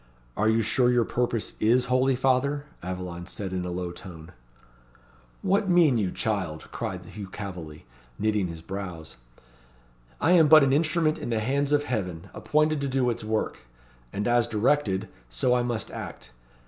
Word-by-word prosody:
"Are 110 +2 +2
you 110 +1 +3
sure 120 +3 +3
your 120 -2 +3
purpose 120 -2 -1
is 120 +3 +3
holy, 130 +1 +2
father?" 135 +3 +1 0.2
Aveline 90 -1 -5
said 95 -1 -5
in 90 -1 -2
a - - -3
low 90 0 -3
tone. 85 -2 -11 1.1
"What 195 +1 +2
mean 165 -9 +5
you, 100 -4 0
child?" 90 -8 -2
cried - - -5
Hugh 100 -2 -8
Calveley, 90 -7 -8 0.3
knitting 105 -3 +1
his 85 -1 -8
brows. 90 -4 -7 1.0
"I 165 - +3
am 165 -4 +6
but 155 -1 +8
an 135 -1 +3
instrument 155 +1 +2
in - - -5
the 115 -2 +1
hands 140 +5 0
of 145 0 +3
Heaven, 95 - -4
appointed 155 -1 +1
to 140 - -1
do 130 -2 +1
its 115 - -5
work; 110 0 -2 0.5
and 105 +2 -2
as 120 -1 +3
directed, 110 -3 +1 0.2
so - - +1
I 125 - +3
must 120 -3 -3
act. - - -8
110 Hz, 165 wpm, -26 LUFS, 95-135 Hz, 1.1 s, but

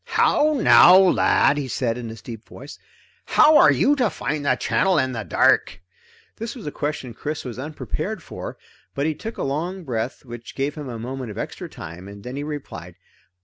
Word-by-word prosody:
"How 305 +1 +4
now, 180 -5 +8
lad," 180 -5 +4
he 140 - -3
said 120 -2 -1
in 120 -1 -6
his 110 0 -10
deep 115 -2 -8
voice, 140 +4 -11 0.5
"how 310 0 +5
are - - +7
you 290 - +3
to 245 -5 +2
find 150 -2 -3
the 135 -3 +2
channel 185 +7 +1
in 130 -3 +1
the 115 -3 -4
dark?" 90 - +2 0.6
This 230 +4 -5
was 240 - -10
a 150 - -3
question 145 -5 -4
Chris 150 +6 -5
was 125 -1 -6
unprepared 140 -4 -5
for, - - -8 0.4
but 140 - -1
he 160 - +1
took 225 +9 -8
a - - -3
long 170 +7 -3
breath 125 -1 -4
which 120 -1 -10
gave 140 +2 -1
him 150 -4 -7
a 120 - -6
moment 125 +1 -6
of 105 - -8
extra - - -6
time, 85 +4 -10
and 100 0 -11
then 130 +4 -5
replied. 130 - -7
135 Hz, 195 wpm, -22 LUFS, 120-155 Hz, 0.6 s, now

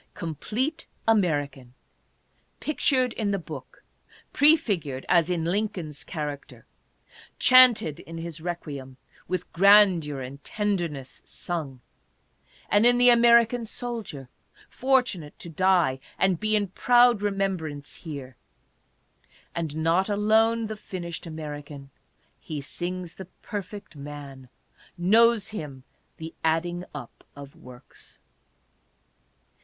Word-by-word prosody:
Complete 225 - -3 0.2
American, 145 - 0 0.8
pic 305 - -4
tured 255 -4 +2
in 215 -3 -2
the 200 - 0
Book; 180 - -10 0.5
prefigured, 200 - +2
as 170 -1 +3
in 175 -2 -1
Lincoln's 180 -5 -2
character, 150 -4 -6 0.7
chanted 250 - +6
in 165 0 -9
his 165 -1 -6
requiem, 145 -7 -6 0.3
with 180 0 -4
grandeur 185 -6 +5
and 135 +2 -9
tenderness 175 -11 -3
sung; 150 -8 -5 0.9
and 205 +1 +3
in 245 0 +4
the 245 0 +6
American 235 0 +5
soldier, 225 - -6 0.4
fortunate 255 - 0
to 170 - -9
die 175 -6 +2 0.2
and 190 -3 +2
be 215 0 +1
in 205 -2 0
proud 240 +1 +4
remembrance 185 -8 -3
here. 140 -6 -8 1.2
And 160 -3 -4
not 165 +5 +1
alone 220 +2 +2
the 215 0 -5
finished 175 -4 -7
American: 145 -3 -8 0.5
he 155 -2 -6
sings 175 +4 -5
the 190 - -9 0.2
Per 205 -3 -3
fect 200 -2 -12
Man; 140 -2 -9 0.5
knows 220 +4 +4
him 145 -10 -7 0.2
" - - -43
the 160 0 -8
adding 175 +2 0
up 135 -5 -10
of 140 -1 -11
works." 125 0 -14
175 Hz, 110 wpm, -26 LUFS, 150-215 Hz, 1.2 s, chanted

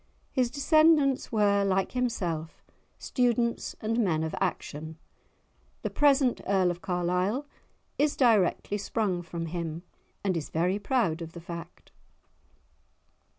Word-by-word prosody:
His 255 -3 +1
descendants 290 0 +3
were, 205 -2 +3
like 190 -1 +1
himself, 175 -11 -2 0.3
students 240 -2 0
and 225 +2 0
men 165 -8 +1
of 160 - -3
action; 160 -4 -3 0.9
the - - -2
present 275 -3 +3
Earl 190 -2 +3
of 175 +1 -7
Carlisle 180 +8 0 0.5
is 295 0 +2
directly 210 -4 +2
sprung 200 -3 -1
from 170 -1 -5
him, 165 0 -4 0.4
and 190 -3 +1
is 160 -3 -3
very 180 +5 0
proud 205 - 0
of 165 0 -7
the 170 - -8
fact. 170 0 -9
195 Hz, 120 wpm, -28 LUFS, 170-245 Hz, 0.9 s, descendants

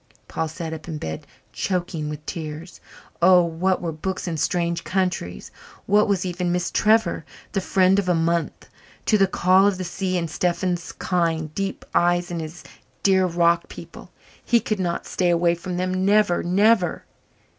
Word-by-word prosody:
Paul 160 - -2
sat 160 +1 -6
up 160 0 -8
in 160 -3 -4
bed, 80 - -6 0.3
choking 175 -5 -2
with 150 0 -7
tears. 160 0 -7 0.4
Oh, 180 0 +7
what 175 +3 0
were 170 - -1
books 185 +5 -4
and 165 -3 -2
strange 170 0 0
countries? 180 - -2 0.3
what 210 +2 +4
was 195 -3 0
even 175 0 -2
Miss 180 0 -1
Trevor, 220 +1 +2 0.3
the 195 - -1
friend 190 +1 +3
of 185 -2 -1
a 175 - +3
month? 165 +1 -1 0.4
to 215 - +3
the 195 - +5
call 185 +1 +4
of 200 -2 +1
the 185 - -4
sea 185 +1 -2
and 170 -1 -1
Stephen's 175 +1 -1
kind, 165 -4 -1
deep 195 +2 -4
eyes 175 0 +2
and 170 -1 -3
his 160 +2 -8 0.4
dear 190 -1 +4
rock 170 0 +2
people? - - -11 0.3
He 235 - +3
could 215 -2 -3
not 175 -2 -2
stay 180 -1 0
away 170 0 +3
from 175 +1 -5
them 185 +1 -1
never 205 -2 +3
never. 190 0 +2
175 Hz, 170 wpm, -23 LUFS, 170-190 Hz, 0.4 s, Oh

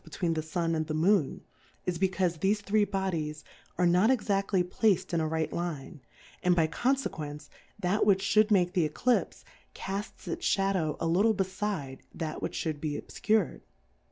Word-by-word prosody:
49 - - -11
tween 170 -3 +1
the 160 - -1
Sun 165 +1 -1
and 155 -1 -1
the 155 - -2
Moon, 165 -2 +2 0.4
is 180 -2 -2
be 190 0 +3
caufe 180 -3 -1
thefe 205 +4 +1
three 205 +1 +2
Bodies 170 -6 -2 0.3
are 180 - +3
not 180 +6 +4
exaSly 200 -6 +1
placM 190 0 +1
in 170 - +2
a 160 - 0
right 160 0 -1
Line, 165 -3 -4 0.4
and 180 -1 +3
by 165 -2 +4
Confe 260 - 0
quence 150 -1 -7 0.3
that 195 +1 +1
which 195 -1 +3
fhould 215 +1 +4
make 180 -4 +3
the 175 -5 +2
Eclipfe, 250 +8 0 0.3
cafts 200 +1 -5
its 165 - -4
Shadow 195 -6 +1
a - - -2
little 200 +7 +3
befide 190 -8 -3 0.2
that 160 -2 -4
which - - -3
(hould 155 -3 -3
be 150 -2 -2
obfcur'd. 215 -4 0
180 Hz, 180 wpm, -29 LUFS, 160-200 Hz, 0.4 s, not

